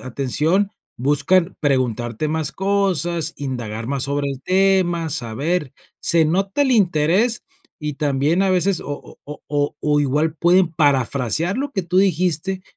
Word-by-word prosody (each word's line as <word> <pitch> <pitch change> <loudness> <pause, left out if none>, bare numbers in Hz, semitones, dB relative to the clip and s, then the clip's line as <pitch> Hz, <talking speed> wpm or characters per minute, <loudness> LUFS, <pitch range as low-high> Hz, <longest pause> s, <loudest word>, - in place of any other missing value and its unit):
atención, 150 +10 0 0.3
buscan 150 +7 +2
preguntarte 125 -1 0
más 160 0 -2
cosas, 180 -5 0
indagar 115 -5 -4
más 135 -1 -2
sobre 140 +1 -1
el 135 -1 -6
tema, 185 -3 +2
saber, 140 +3 -2 0.3
se 165 -2 +2
nota 195 - 0
el 265 -2 +2
interés 195 +4 +2 0.4
y 150 -1 -3
también 145 +5 +1
a 195 - +2
veces 185 0 +1
o - - -10 0.2
o - - -15
o 150 0 -9
o 145 0 -1
o 150 -1 +2
igual 150 +3 0
pueden 175 0 +4
parafrasear 145 - +1
lo 285 +2 -2
que 190 - -1
tú 175 +1 -3
dijiste 185 0 +1
160 Hz, 145 wpm, -20 LUFS, 140-185 Hz, 0.4 s, pueden